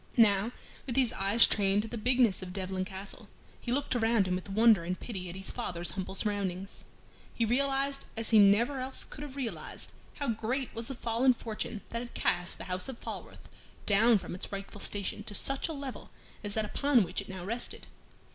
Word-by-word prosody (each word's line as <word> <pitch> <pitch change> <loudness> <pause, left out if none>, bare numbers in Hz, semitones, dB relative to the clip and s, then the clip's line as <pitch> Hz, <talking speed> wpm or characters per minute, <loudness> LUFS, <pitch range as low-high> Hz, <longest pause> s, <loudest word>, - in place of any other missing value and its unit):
Now, 210 -1 +5 0.4
with 245 - -2
his 255 -3 +3
eyes 200 +4 +5
trained 200 0 +2
to - - -5
the 235 - -6
bigness 235 -2 +3
of 180 -1 -6
Devlen 185 -1 -2
Castle, 200 +2 -7 0.3
he 240 - -4
looked 270 0 0
around 225 -4 +3
him 180 - 0
with 185 +2 -3
wonder 215 -2 +5
and 180 +2 -3
pity 190 -6 -5
at 170 - -7
his 190 0 -2
father's 175 0 -2
humble 190 0 -4
surroundings. 195 -2 -2 0.5
He 230 - +2
realized 275 +3 +1
as 225 0 -2
he 220 - +8
never 225 +7 +5
else 260 +1 -2
could - - -10
have 290 -2 -7
realized 260 -5 -3 0.2
how 280 - -2
great 235 +4 -1
was 230 0 -5
the 270 - -4
fall 230 0 -1
in 260 -2 +6
fortune 215 -2 -4
that 230 - -2
had 240 - -9
cast 175 0 0
the - - -6
house 185 +4 -2
of 260 - -6
Falworth - - -8 0.4
down 220 +3 +6
from 190 - -6
its 180 - -6
rightful 200 +1 -6
station 205 0 -3
to 205 - -2
such 275 +6 +2
a - - -4
level 275 -3 -6 0.3
as 205 -1 -3
that 220 -1 +1
upon 270 +1 +3
which 185 +2 -2
it 200 - -11
now 185 -2 -6
rested. 230 +4 -4
215 Hz, 205 wpm, -31 LUFS, 195-245 Hz, 0.5 s, he